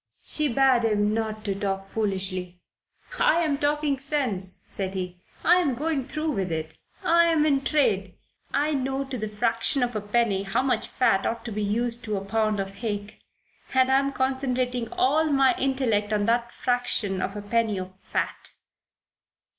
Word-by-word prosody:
She 305 -1 +1
bade 260 -1 +3
him 210 -1 +2
not 215 -1 -3
talk 195 -1 -2
foolishly. 190 -4 -3 0.6
"I'm 315 -4 +3
talking 290 -1 +1
sense," 255 -10 -2
said 195 -1 -5
he. 180 -1 -5 0.2
"I'm 345 -6 +4
going 290 -1 -1
through 305 +1 -2
with 190 - -2
it. 160 0 -3 0.3
I'm 335 -2 +4
in 280 -3 +3
trade. 200 -11 +1 0.4
I 300 +2 +1
know 270 0 -1
to 270 -1 -5
the 215 -3 -3
fraction 230 +5 +1
of 245 -1 -2
a 215 - -1
penny 205 -1 +1
how 195 +5 0
much 250 -4 0
fat 195 -6 +2
ought 230 +1 -3
to 235 - -4
be 210 0 -3
used 235 +3 0
to 210 -2 -1
a 195 - -5
pound 215 0 0
of 195 0 -4
hake, 205 -2 -4 0.6
and 260 0 +4
I'm 275 +1 +3
concentrating 255 -3 -1
all 300 +5 +2
my 275 -4 +4
intellect 245 -6 +1
on 205 -1 +1
that 235 +1 +1
fraction 240 -6 0
of 195 - -3
a 205 - -4
penny 220 -1 +1
of 185 0 -5
fat." - - -3
230 Hz, 160 wpm, -26 LUFS, 205-270 Hz, 0.6 s, I'm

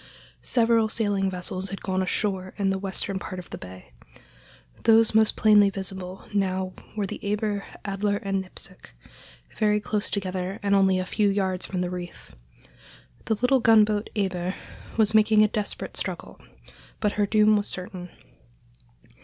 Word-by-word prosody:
Several 230 -2 +3
sailing 205 -3 +1
vessels 185 +1 -3
had 195 - -7
gone 190 -1 0
ashore 185 0 -2
in 195 -2 +1
the 190 - -1
western 195 0 -3
part 185 - -7
of 180 - -9
the - - -5
bay. 90 0 -11 0.9
Those 225 -1 +5
most 220 0 +4
plainly 210 -2 +5
visible 190 -1 -6
now 190 -2 0 0.2
were 205 - 0
the - - -7
Eber, 205 0 -1 0.2
Adler, 200 +1 0
and 195 -1 -2
Nipsic, 185 - -12 0.6
very 210 -1 +3
close 210 0 -2
together 185 -1 -3
and 200 0 +2
only 190 -1 +4
a 185 - -1
few 205 +2 +1
yards 190 -2 0
from 185 -2 -2
the 180 0 -2
reef. 175 - -8 0.9
The 220 - +1
little 250 +4 +3
gunboat 215 -2 +4
Eber 185 -3 -1 0.4
was 220 -1 +3
making 215 0 +5
a - - +5
desperate 210 -1 -4
struggle, - - -6 0.6
but 210 - +1
her 205 -1 0
doom 215 0 +4
was 205 0 0
certain. 180 -1 -6
200 Hz, 155 wpm, -25 LUFS, 185-210 Hz, 0.9 s, Those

